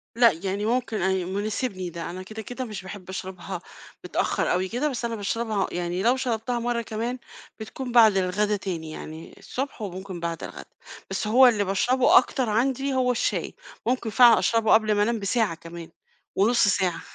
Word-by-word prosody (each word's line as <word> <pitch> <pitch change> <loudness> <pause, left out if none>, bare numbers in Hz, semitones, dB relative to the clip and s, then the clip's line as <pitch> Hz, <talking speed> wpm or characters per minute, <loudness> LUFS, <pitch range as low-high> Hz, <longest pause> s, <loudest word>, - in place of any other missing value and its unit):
لأ 235 -2 +6
يعني 200 +2 -2
ممكن 230 -2 -1
أن 190 0 0
مناسبني 200 -2 -2
ده، 170 0 -6
أنا 185 +2 -7
كده، 215 +3 -8
كده 250 +4 -6
مش 215 -5 -7
باحب 190 -1 -9
أشربها 185 -1 -6 0.4
متأخَّر - - 0
أوي 185 +1 0
كده، 260 +8 -1
بس 245 -3 -3
أنا 230 -1 -2
باشربها 215 0 -1
يعني 175 +2 -2
لو 245 +2 +4
شربتها 240 -1 -2
مَرّة 235 0 -1
كمان، 230 +3 -3 0.4
بتكون 245 +3 -6
بعد 220 -5 +6
الغدا 205 +3 +1
تاني، 170 -6 -5
يعني 160 +1 -9
الصبح 265 -3 -5
وممكن 190 -2 -6
بعد 170 -3 -4
الغدا، - - -8 0.4
بس 195 +2 -2
هو 255 +4 +7
اللي 215 -4 +3
باشربه 245 +7 +3
أكتر 250 -1 +2
عندي 265 +5 0
هو 255 -1 +2
الشاي، 245 - -1 0.3
ممكن 245 -2 0
فعلًا 235 +1 +7
أشربه 225 -2 +2
قبل 215 -1 +4
ما 205 - +3
أنام 230 +1 0
بساعة 205 -2 0
كمان، 165 0 -10 0.5
ونُص 220 +2 +3
ساعة. 190 -4 +1
215 Hz, 175 wpm, -25 LUFS, 190-240 Hz, 0.5 s, هو